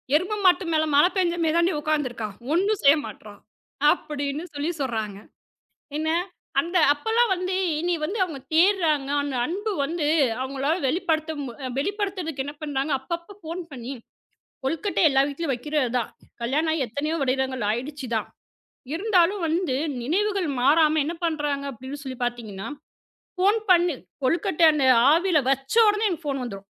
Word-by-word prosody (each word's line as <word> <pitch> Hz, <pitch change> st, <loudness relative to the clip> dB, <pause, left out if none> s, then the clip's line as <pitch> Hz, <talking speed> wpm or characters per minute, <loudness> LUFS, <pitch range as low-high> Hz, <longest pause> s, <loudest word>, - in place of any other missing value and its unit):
எருமை 370 Hz, +7 st, +1 dB
மாட்டு 365 Hz, +1 st, +5 dB
மேல 315 Hz, -, +3 dB
மழை 295 Hz, +5 st, +6 dB
பெஞ்ச 350 Hz, -2 st, +2 dB
மாதிரிதான்டி 340 Hz, +3 st, +2 dB
உக்காந்து 300 Hz, -2 st, 0 dB
இருக்கான். 220 Hz, -4 st, -6 dB, 0.2 s
ஒன்னும் 395 Hz, +4 st, +1 dB
செய்ய 280 Hz, +1 st, +7 dB
மாட்றான்" 205 Hz, -1 st, -11 dB, 0.5 s
அப்படின்னு 285 Hz, +1 st, -3 dB
சொல்லிச் 310 Hz, +2 st, -3 dB
சொல்றாங்க. 220 Hz, -6 st, -3 dB, 0.8 s
என்ன? 315 Hz, +1 st, 0 dB, 0.5 s
அந்த 345 Hz, +2 st, 0 dB
அப்பல்லாம் 445 Hz, +9 st, +1 dB
வந்து 370 Hz, +1 st, -2 dB, 0.3 s
இனி 350 Hz, +1 st, 0 dB
வந்து 410 Hz, +7 st, -3 dB
அவுங்க 310 Hz, -6 st, -7 dB
தேட்றாங்க. 325 Hz, -6 st, +3 dB
அந்த 285 Hz, -2 st, -4 dB
அன்பு 410 Hz, -, -3 dB
வந்து 310 Hz, +1 st, -2 dB, 0.4 s
அவுங்களால 275 Hz, +4 st, -1 dB
வெளிப்படுத்த 320 Hz, 0 st, 0 dB, 0.3 s
அ -, -, -2 dB
வெளிப்படுத்துறதுக்கு 370 Hz, -4 st, -2 dB
என்ன 290 Hz, +2 st, -6 dB
பண்றாங்க, 285 Hz, 0 st, -1 dB
அப்பப்ப 340 Hz, +7 st, -6 dB
ஃபோன் 335 Hz, +3 st, -5 dB
பண்ணி 255 Hz, 0 st, -6 dB, 0.7 s
கொழுக்கட்டை 330 Hz, +8 st, -1 dB
எல்லா 270 Hz, -1 st, +4 dB
வீட்லயும் 290 Hz, 0 st, -2 dB
வைக்கிறதுதான். 250 Hz, -3 st, -1 dB, 0.3 s
கல்யாணம் 305 Hz, +6 st, +1 dB
ஆயி 280 Hz, -5 st, 0 dB
எத்தனையோ 295 Hz, +8 st, -2 dB
வருடங்கள் 260 Hz, -3 st, 0 dB
ஆயிடுச்சு. 265 Hz, +4 st, -4 dB, 0.9 s
இருந்தாலும் 380 Hz, 0 st, +2 dB
வந்து 325 Hz, -4 st, 0 dB, 0.3 s
நினைவுகள் 385 Hz, -, 0 dB
மாறாம 310 Hz, +2 st, +4 dB
என்ன 330 Hz, -, -3 dB
பண்றாங்க 295 Hz, -3 st, -1 dB
அப்படின்னு 260 Hz, +4 st, -8 dB
சொல்லிப் 255 Hz, -2 st, -6 dB
பார்த்தீங்கன்னா, 220 Hz, -5 st, -5 dB, 0.7 s
ஃபோன் 405 Hz, +4 st, +3 dB
பண்ணு, 345 Hz, -3 st, +4 dB, 0.3 s
கொழுக்கட்டை 335 Hz, +4 st, +2 dB
அந்த 280 Hz, -3 st, +1 dB, 0.3 s
ஆவியில 340 Hz, 0 st, +3 dB
வச்ச 270 Hz, +5 st, -2 dB
உடனே 420 Hz, +1 st, +2 dB
எனக்குப் 340 Hz, -3 st, -4 dB
ஃபோன் 275 Hz, -2 st, -2 dB
வந்துரும். 200 Hz, -5 st, -7 dB
310 Hz, 140 wpm, -24 LUFS, 270-350 Hz, 0.9 s, செய்ய